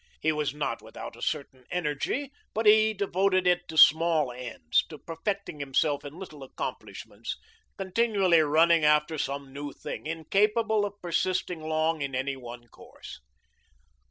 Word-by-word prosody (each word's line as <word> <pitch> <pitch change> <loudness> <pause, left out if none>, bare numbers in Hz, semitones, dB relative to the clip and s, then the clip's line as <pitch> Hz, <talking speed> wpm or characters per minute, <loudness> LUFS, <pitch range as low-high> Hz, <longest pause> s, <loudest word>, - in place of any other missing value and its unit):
He 160 - +2
was 150 -2 -1
not 150 0 -3
without - - -9
a - - -14
certain 130 -2 -3
energy, 180 - -2 0.2
but 220 +1 -1
he 215 +1 +6
devoted 190 -2 +1
it 180 0 +2
to 160 - -7
small 160 -3 +6
ends, 120 -11 -1
to 155 - -9
perfecting 165 +2 -4
himself 140 +1 0
in 145 +3 -9
little 165 -6 -10
accomplishments, 135 - -6 0.4
continually 195 -3 +2
running 160 +2 +4
after 150 +1 +3
some 140 0 -4
new 145 0 -6
thing, 150 - -7
incapable 210 +7 +1
of 205 0 -7
persisting 180 -1 -1
long 155 0 0
in 140 -2 -3
any 135 +2 -1
one 120 -2 -10
course. - - -13
160 Hz, 145 wpm, -28 LUFS, 145-190 Hz, 0.4 s, he